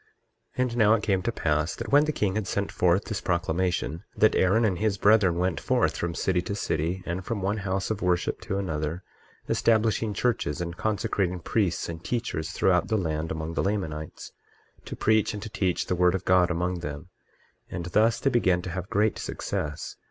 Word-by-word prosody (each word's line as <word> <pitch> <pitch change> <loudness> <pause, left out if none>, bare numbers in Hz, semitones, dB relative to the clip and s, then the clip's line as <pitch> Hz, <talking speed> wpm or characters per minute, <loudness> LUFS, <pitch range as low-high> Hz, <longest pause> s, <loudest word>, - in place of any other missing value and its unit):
23:4 130 - +3
And 120 -1 -3
now 110 -1 +5
it 105 - -3
came 95 -4 +1
to 120 - -1
pass 75 -5 0
that 115 -1 -6
when 145 +2 +6
the 155 - 0
king 105 -9 0
had 105 -1 -2
sent 100 +1 -2
forth 90 +2 +2
this 105 -2 -3
proclamation, 85 -2 -1
that - - +5
Aaron 100 +5 +3
and 95 -5 0
his 105 -2 +1
brethren 100 -4 +4
went 90 -1 0
forth - - +1
from 85 -1 -3
city 90 0 +1
to 100 - -4
city, 90 -1 -2
and 90 +2 -3
from 105 0 -3
one 100 +3 0
house 95 0 -2
of 105 - -3
worship 90 -1 0
to 95 - -3
another, 80 -2 -3 0.4
establishing 110 -1 +2
churches, 110 -10 0
and 85 -1 -4
consecrating 95 -3 -1
priests 90 0 0
and 85 0 -7
teachers 115 -10 -2
throughout 90 +1 +2
the 110 - +1
land 80 -3 -2
among 80 +1 -4
the - - 0
Lamanites, 80 -7 -3 0.5
to - - -6
preach 110 0 +2
and 105 - -6
to 110 - -6
teach 90 -3 0
the - - -1
word 90 0 +3
of 95 - -4
God 90 -1 +4
among 90 +1 -1
them; 75 +1 -6 0.6
and 85 - -5
thus 110 +6 +2
they 135 - +1
began 90 -8 +2
to 90 - -5
have 90 +1 -5
great 105 +1 +1
success. 75 0 -4
95 Hz, 200 wpm, -26 LUFS, 85-105 Hz, 0.6 s, when